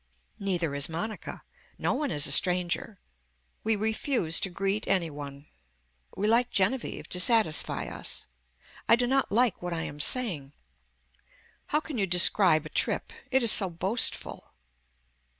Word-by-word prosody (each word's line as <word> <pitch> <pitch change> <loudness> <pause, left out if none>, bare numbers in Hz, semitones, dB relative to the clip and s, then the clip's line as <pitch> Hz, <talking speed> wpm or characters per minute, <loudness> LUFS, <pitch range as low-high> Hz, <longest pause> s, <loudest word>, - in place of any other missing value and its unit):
Neither 180 -7 -2
is 140 +1 0
Monica. 175 +7 -6 0.3
No - - -1
one 285 +1 -2
is 145 -9 +2
a - - +2
stranger. 180 +5 +1 0.6
We 220 0 +1
refuse 220 - 0
to 195 - 0
greet 195 +3 -3
any 175 -5 0
one. 140 0 -9 0.7
We 205 - -1
like 235 +2 +3
Genevieve 220 +7 -2
to 180 - -2
satisfy 215 -5 +1
us. - - -5 0.6
I 230 - +8
do 245 +1 -1
not 270 +2 0
like 235 0 +1
what 175 -1 -4
I 165 -1 -3
am 145 - -8
saying. 150 - +1 1.1
How 300 - 0
can 295 -7 -6
you 195 - 0
describe 175 -2 +5
a - - -8
trip. - - -2 0.2
It 265 -1 +2
is 230 - +6
so 195 -3 +3
boastful. 190 +7 -1
195 Hz, 150 wpm, -27 LUFS, 165-230 Hz, 1.1 s, I